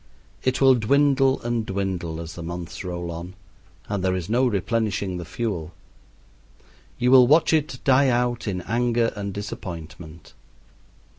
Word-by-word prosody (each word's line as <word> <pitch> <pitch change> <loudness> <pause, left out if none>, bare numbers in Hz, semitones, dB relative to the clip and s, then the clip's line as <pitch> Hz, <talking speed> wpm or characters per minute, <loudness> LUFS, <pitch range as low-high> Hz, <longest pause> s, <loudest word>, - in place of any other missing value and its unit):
It 130 0 0
will 135 -1 +6
dwindle 135 +2 +3
and 120 -1 -1
dwindle 95 -5 -3
as 85 -1 -7
the 85 - -8
months 85 +1 -6
roll 85 -2 -4
on, 85 +3 -8 0.5
and 100 -2 -2
there 95 0 +1
is 90 +2 -4
no 125 +2 +3
replenishing 100 -2 -1
the 85 - -6
fuel. 85 -3 -4 1.2
You 125 0 +2
will 130 -2 +8
watch 155 +4 +4
it 150 -5 +1
die 135 +1 +4
out 120 -1 0
in 90 -3 -2
anger 120 +1 +1
and 100 -1 -4
disappointment. 85 -5 -8
105 Hz, 145 wpm, -24 LUFS, 90-125 Hz, 1.2 s, will